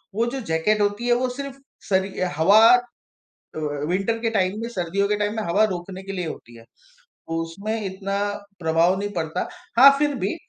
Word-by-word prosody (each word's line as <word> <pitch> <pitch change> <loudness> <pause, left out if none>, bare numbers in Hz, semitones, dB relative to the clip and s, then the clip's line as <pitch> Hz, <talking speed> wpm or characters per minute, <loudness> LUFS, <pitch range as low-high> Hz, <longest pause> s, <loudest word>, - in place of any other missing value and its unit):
वो 230 +2 +1
जो - - -3
जैकेट 210 +7 +2
होती 205 +4 0
है 240 - +4
वो 250 +1 0
सिर्फ़ 275 +1 -7 0.3
शरि 190 0 0
अ, 185 - +1
हवा 195 +7 +6 1.0
अ, - - -3 0.3
विन्टर 195 +6 0
के 230 - +1
टाइम 200 -1 0
में, 230 - -4
सर्दियों 195 -2 -1
के 210 - +1
टाइम 210 +1 -1
में 220 - -1
हवा 200 +4 +2
रोकने 190 -1 -4
के 195 +1 -7
लिए 180 -3 -3
होती 120 -6 -9
है। 115 - -14 0.4
तो 165 - -9
उसमें 200 +7 -4
इतना 195 +1 -3 0.4
प्रभाव 165 +2 +2
नहीं 205 +1 -3
पड़ता, 165 0 -2 0.3
हाँ 275 +2 +11
फिर 295 0 +1
भी 195 - -1
195 Hz, 195 wpm, -23 LUFS, 180-220 Hz, 1.0 s, हाँ